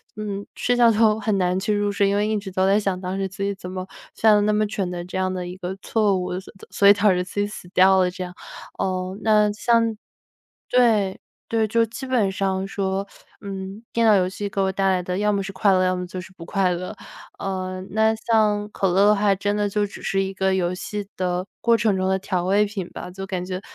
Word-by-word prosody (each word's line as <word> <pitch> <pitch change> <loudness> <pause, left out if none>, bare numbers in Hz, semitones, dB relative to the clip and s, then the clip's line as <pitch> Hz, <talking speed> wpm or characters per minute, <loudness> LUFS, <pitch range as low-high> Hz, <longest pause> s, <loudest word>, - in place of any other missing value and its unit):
嗯， 205 -1 -5
睡 245 - +1
觉 240 -1 +6
都 215 -1 +3
很 215 -2 0
难 180 0 +1
去 210 +2 0
入 205 0 +1
睡， 200 0 +2
因 200 - +1
为 210 +1 +1
一 215 - 0
直 195 -2 -6
都 185 +1 +1
在 200 +1 +4
想 195 -3 -1
当 185 +1 -4
时 195 - -1
自 195 +1 -10
己 200 0 -1
怎 180 -1 -8
么 185 0 -5 0.3
犯 220 -1 +5
了 205 - +3
那 210 +1 +2
么 215 0 +1
蠢 195 -3 -3
的 175 -1 -4
这 180 - -5
样 185 0 0
的 180 -1 -4
一 180 - -7
个 185 0 -5
错 210 -4 +1
误， 180 0 -3
所 - - -15 0.2
所 200 - +3
以 - - +10
导 205 +1 +3
致 180 - 0
自 200 +2 -6
己 205 - +1
死 190 -4 -10
掉 190 +1 +5
了 180 -1 +2
这 185 - -9
样。 180 0 -7 0.4
呃， 185 0 -2
那 210 -1 +4
像 230 0 +2 0.7
对， 220 -6 +3 0.3
对， 225 -1 +1
就 230 +2 +2
基 235 +4 -8
本 245 -6 +1
上 190 0 -1
说， 195 0 -2 0.3
嗯， 195 0 -7
电 230 0 +2
脑 215 -2 +6
游 185 -1 +3
戏 200 +2 -4
给 200 - -4
我 190 0 +2
带 195 0 -1
来 185 -1 +2
的 180 +1 -3
要 210 +1 +2
么 200 -1 0
是 195 0 -6
快 195 +1 +3
乐， 185 - +3
要 185 0 +1
么 180 - -4
就 185 +1 -7
是 185 +1 -10
不 170 -2 -11
快 190 -2 +1
乐。 180 +3 -5 0.5
呃， 185 -1 -3
那 220 +1 +3
像 215 -2 +1
可 195 -3 0
乐 195 +3 +4
的 210 0 +5
话， 200 0 +3
真 205 +2 -1
的 205 -1 0
就 205 0 0
只 - - -11
是 195 0 0
一 195 0 -3
个 190 0 +1
游 180 -1 0
戏 205 +1 -5
的 180 0 -1 0.2
过 235 -1 +4
程 215 -3 +2
中 190 0 0
的 190 0 +1
调 185 -2 -2
味 200 +3 +3
品 200 -4 -5
吧， 180 - -7
就 195 +1 -7
感 185 -2 -4
觉， 185 0 -4
195 Hz, 270 characters per minute, -23 LUFS, 185-210 Hz, 0.7 s, 以